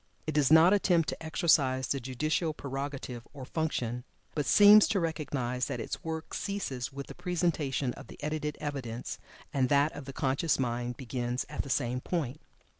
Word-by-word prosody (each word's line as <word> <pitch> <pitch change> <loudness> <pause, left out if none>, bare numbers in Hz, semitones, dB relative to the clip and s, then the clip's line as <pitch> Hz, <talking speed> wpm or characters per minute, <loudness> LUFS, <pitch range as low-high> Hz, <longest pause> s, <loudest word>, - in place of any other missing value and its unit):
It 155 - -1
does 145 -3 +3
not 160 +4 +8
attempt 175 -5 +3
to - - -5
exercise 140 -5 +2
the 140 - 0
judicial 155 +5 -1
prerogative 135 -3 -5
or 135 -3 -8
function, 125 -6 -2 0.3
but 150 -2 -1
seems 205 0 +8
to 210 -3 +1
recognize 140 -6 -2
that 125 -4 -3
its - - -5
work 160 -1 -5
ceases 165 -12 -3
with 140 0 -6
the - - -9
presentation 165 -7 -1
of - - -11
the - - -12
edited 150 0 -2
evidence, 130 -6 -5 0.3
and 130 -3 +2
that 145 +2 +4
of 145 -1 -8
the 135 - -6
conscious 135 +5 +1
mind 120 -1 -2
begins 125 -1 -3
at - - -2
the 140 - -9
same 125 -1 0
point. 150 -5 -3
140 Hz, 175 wpm, -30 LUFS, 130-160 Hz, 0.3 s, not